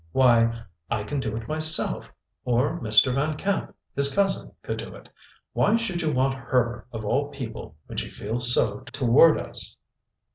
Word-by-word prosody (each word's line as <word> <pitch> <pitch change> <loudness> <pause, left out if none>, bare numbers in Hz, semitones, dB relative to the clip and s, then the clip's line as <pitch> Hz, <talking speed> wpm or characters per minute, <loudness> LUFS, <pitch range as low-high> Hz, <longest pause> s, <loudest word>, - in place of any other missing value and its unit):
Why, 115 -3 +3 0.3
I 105 -3 -1
can 145 +6 -3
do 110 -4 -3
it 115 -1 -7
myself; 155 +1 +1 0.3
or 125 +7 0
Mr. 115 +1 +4
Van 150 +3 -1
Camp, 195 +4 -2 0.2
his 140 0 +3
cousin, 195 -1 0
could - - -4
do - - -8
it. - - -15 0.4
Why 215 +2 +3
should 190 -7 -3
you 160 -2 0
want 135 0 +1
her, 120 -2 -1
of 110 -2 -6
all 140 +7 0
people, 125 - -8
when - - -5
she - - -5
feels 120 +3 0
so - - +2
toward 140 +3 +4
us?" - - -3
130 Hz, 170 wpm, -25 LUFS, 115-155 Hz, 0.4 s, Mr